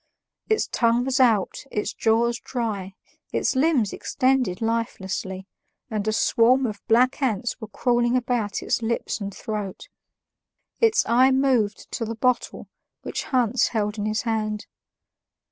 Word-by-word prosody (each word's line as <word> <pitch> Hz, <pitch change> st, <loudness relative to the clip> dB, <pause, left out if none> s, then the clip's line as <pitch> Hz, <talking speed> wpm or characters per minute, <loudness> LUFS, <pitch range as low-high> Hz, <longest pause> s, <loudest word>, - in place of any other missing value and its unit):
Its 435 Hz, -, +2 dB
tongue 235 Hz, +1 st, +1 dB
was 265 Hz, 0 st, 0 dB
out, 225 Hz, -7 st, +2 dB
its 210 Hz, -, -2 dB
jaws 235 Hz, +1 st, +1 dB
dry, 205 Hz, -6 st, -4 dB, 0.4 s
its -, -, 0 dB
limbs 260 Hz, -7 st, +2 dB
extended 255 Hz, -8 st, 0 dB
lifelessly, 190 Hz, -4 st, -3 dB, 0.5 s
and 215 Hz, -1 st, -2 dB
a -, -, +3 dB
swarm 240 Hz, +4 st, +3 dB
of 210 Hz, -4 st, -4 dB
black 250 Hz, +5 st, +3 dB
ants 240 Hz, -1 st, -1 dB
were 220 Hz, -, -6 dB
crawling 240 Hz, +3 st, +1 dB
about 240 Hz, -4 st, -1 dB
its -, -, 0 dB
lips 230 Hz, -1 st, -2 dB
and 200 Hz, 0 st, -4 dB
throat. 205 Hz, -1 st, -6 dB, 0.9 s
Its 455 Hz, -1 st, +3 dB
eye 250 Hz, +3 st, +5 dB
moved 260 Hz, -6 st, +1 dB
to -, -, -3 dB
the 230 Hz, 0 st, -4 dB
bottle 250 Hz, +2 st, -1 dB, 0.4 s
which -, -, -4 dB
Hans 250 Hz, -4 st, +2 dB
held 210 Hz, -1 st, -2 dB
in 205 Hz, -, -1 dB
his 215 Hz, +5 st, -1 dB
hand. 215 Hz, -2 st, -2 dB
230 Hz, 140 wpm, -24 LUFS, 210-255 Hz, 0.9 s, eye